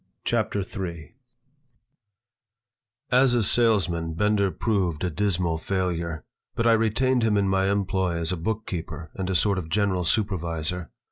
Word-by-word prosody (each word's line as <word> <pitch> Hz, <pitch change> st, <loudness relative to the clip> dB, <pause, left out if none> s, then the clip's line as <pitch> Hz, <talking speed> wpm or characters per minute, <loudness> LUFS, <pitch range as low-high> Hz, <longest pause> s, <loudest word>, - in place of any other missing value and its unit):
CHAPTER 100 Hz, -, 0 dB
III 90 Hz, -3 st, -6 dB, 2.0 s
AS 125 Hz, 0 st, +5 dB
a 120 Hz, -, +2 dB
salesman 90 Hz, -8 st, +2 dB
Bender 105 Hz, +1 st, +2 dB
proved 90 Hz, -4 st, -1 dB
a 90 Hz, -, 0 dB
dismal 90 Hz, -3 st, 0 dB
failure, 85 Hz, -4 st, -2 dB, 0.3 s
but 115 Hz, -, 0 dB
I 115 Hz, -, +6 dB
retained 115 Hz, +3 st, +2 dB
him 110 Hz, -2 st, +2 dB
in 100 Hz, -1 st, +2 dB
my 95 Hz, 0 st, +2 dB
employ 95 Hz, -3 st, 0 dB
as 85 Hz, +1 st, -2 dB
a -, -, 0 dB
bookkeeper 85 Hz, -3 st, -4 dB
and 95 Hz, -1 st, -4 dB
a 95 Hz, -, 0 dB
sort 100 Hz, +2 st, +2 dB
of 80 Hz, -3 st, -7 dB
general 95 Hz, 0 st, +1 dB
supervisor. 90 Hz, -3 st, -1 dB
95 Hz, 140 wpm, -25 LUFS, 85-105 Hz, 2.0 s, I